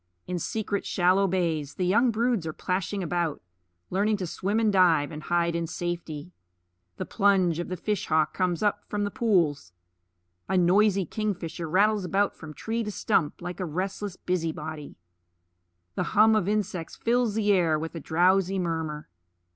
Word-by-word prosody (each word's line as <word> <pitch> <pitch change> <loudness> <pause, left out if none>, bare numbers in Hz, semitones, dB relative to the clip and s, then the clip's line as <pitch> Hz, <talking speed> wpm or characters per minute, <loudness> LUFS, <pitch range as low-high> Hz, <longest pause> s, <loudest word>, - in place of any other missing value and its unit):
In 180 -1 -3
secret 205 +3 -2
shallow 185 +2 +2
bays 165 -6 -1
the 185 - -1
young 225 +7 +4
broods 230 -5 0
are 155 - -3
plashing 190 +3 -2
about, 170 -2 -1 0.5
learning 205 +3 +1
to 190 - -3
swim 195 +5 -1
and 220 -2 +2
dive 170 -6 +4
and 155 -1 -7
hide 170 +1 0
in 170 0 -1
safety. 170 -2 -5 0.7
The - - -3
plunge 190 -5 +2
of 175 - -3
the 185 - -4
fish 205 +2 -2
hawk 155 -1 +2
comes 180 -1 0
up 205 - +1
from 205 0 -1
the 205 - -2
pools. 165 - +1 0.8
A 190 - +2
noisy 195 +2 +4
kingfisher 175 -4 -4
rattles 205 +4 +3
about 195 +2 +1
from 155 -2 -10
tree 230 +1 -2
to 210 - -4
stump, 180 -6 0
like 175 +1 -5
a 185 - -1
restless 190 +4 -3
busy 175 -3 -1
body. 155 -1 -7 1.0
The - - -2 0.2
hum 220 +1 +7
of 205 -4 +1
insects 205 -5 -2
fills 235 -2 +1
the 210 -2 +2
air 170 -5 +3
with 160 +1 -5
a 165 - -5
drowsy 185 +5 +2
murmur. 160 -4 -3
180 Hz, 170 wpm, -27 LUFS, 165-205 Hz, 1.0 s, hum